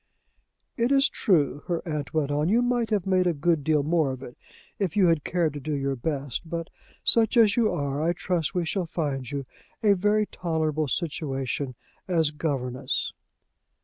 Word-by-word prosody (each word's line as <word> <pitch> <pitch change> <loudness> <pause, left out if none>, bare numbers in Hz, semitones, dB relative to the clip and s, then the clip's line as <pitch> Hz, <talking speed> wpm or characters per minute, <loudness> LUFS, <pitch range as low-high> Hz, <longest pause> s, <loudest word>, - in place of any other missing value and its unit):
"It 235 +2 +1
is 275 +1 +5
true," 145 -7 +1
her 175 0 -2
aunt 150 -3 -3
went 150 -3 0
on, 150 +3 +1
"you 235 +4 +4
might 245 -2 +1
have 210 -5 0
made 185 -1 +3
a 170 - +1
good 155 +1 +1
deal 150 -1 +2
more 160 -1 +2
of 130 0 -5
it, 120 - -9 0.4
if 195 -2 -1
you 195 - +6
had 165 -3 +2
cared 170 -4 0
to 145 - -5
do 150 +2 -3
your 140 -1 -1
best; 140 +3 -3
but, 165 +1 -4 0.3
such 230 +1 +3
as 220 -3 +6
you 230 -3 +3
are, 140 0 -2
I 165 +2 +2
trust 175 -1 -1
we 175 -2 +1
shall 180 +1 -1
find 140 -6 -2
you 140 -2 -4 0.4
a 205 -2 +6
very 210 +3 +2
tolerable 160 -5 -1
situation 140 -4 -2 0.3
as 165 -5 +2
governess." 135 -5 -2
160 Hz, 180 wpm, -26 LUFS, 145-185 Hz, 0.4 s, you